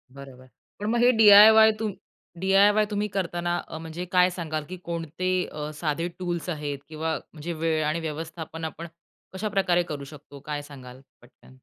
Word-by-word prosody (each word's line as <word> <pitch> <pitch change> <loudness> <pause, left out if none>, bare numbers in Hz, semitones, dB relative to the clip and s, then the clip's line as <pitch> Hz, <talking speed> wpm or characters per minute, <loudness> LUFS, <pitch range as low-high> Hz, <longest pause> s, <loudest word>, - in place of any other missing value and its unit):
बरोबर, 130 -2 -12 0.3
पण 210 - -5
मग 235 +1 +1
हे, 250 - +6
डी-आय-वाय 220 0 +8
तुम 215 -3 -2 0.5
डी-आय-वाय 200 +3 +4
तुम्ही 210 0 -1
करताना 175 -3 -2
अ, 160 - -7
म्हणजे 165 +2 -6
काय 180 0 +4
सांगाल 155 -4 -4
की 185 - -6
कोणते 170 +2 -4 0.2
अ, 150 0 -6
साधे 165 +2 -1
टूल्स 175 -1 -3
आहेत 145 -3 -4
किंवा 160 0 -2 0.2
म्हणजे 165 +2 -6
वेळ 160 -1 0
आणि 155 +3 -1
व्यवस्थापन 160 +1 -6
आपण 165 +2 -7 0.5
कशाप्रकारे 190 -3 0
करू 145 -4 -6
शकतो? 145 0 -12
काय 145 +1 -5
सांगाल 130 -3 -12 0.2
पटकन? 125 +1 -20
165 Hz, 160 wpm, -25 LUFS, 150-190 Hz, 0.5 s, डी-आय-वाय